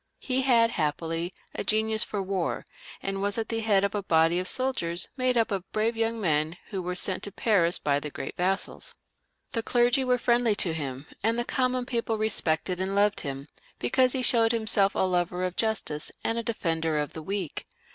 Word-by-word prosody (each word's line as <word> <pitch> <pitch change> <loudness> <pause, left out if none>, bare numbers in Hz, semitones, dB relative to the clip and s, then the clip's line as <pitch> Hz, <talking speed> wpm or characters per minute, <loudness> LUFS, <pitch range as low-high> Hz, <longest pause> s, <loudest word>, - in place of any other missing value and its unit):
He 260 0 0
had 235 -3 +4
happily 165 +2 -2 0.2
a - - -3
genius 220 +1 +1
for 205 -2 -3
war, 190 -2 -2 0.4
and 195 0 -2
was 205 +1 0
at 225 - -2
the 225 - -1
head 210 -3 +2
of 200 - 0
a 205 - -1
body 165 -1 +3
of 185 - -3
soldiers 220 -11 -1
made 255 -2 +1
up 230 -1 +2
of 195 -1 -4
brave 220 +2 0
young 225 0 -1
men 160 -3 0
who 195 -2 -3
were 180 0 -3
sent 185 +1 +1
to 205 - -5
Paris 180 -6 +2
by 145 -1 +1
the 150 - -5
great 135 - -6
vassals. 190 +2 -2 0.6
The 230 - -1
clergy 245 +3 +2
were 250 -1 +2
friendly 240 -2 +2
to 180 -5 +2
him, 140 -3 -4 0.2
and 225 +3 +1
the 240 - -1
common 255 -1 0
people 235 -3 -1
respected 180 -4 0
and 190 +1 -1
loved 205 +1 +3
him, 140 -1 -5 0.3
because 255 - +2
he 260 -2 -1
showed 230 -2 +5
himseK 220 -3 +4
a - - +1
lover 180 0 0
of 185 0 -2
justice 215 -9 -1
and 225 - 0
a 235 - 0
defender 165 -8 -1
of 150 -1 -2
the 160 - -6
weak. 190 -1 -4
200 Hz, 200 wpm, -27 LUFS, 170-230 Hz, 0.6 s, showed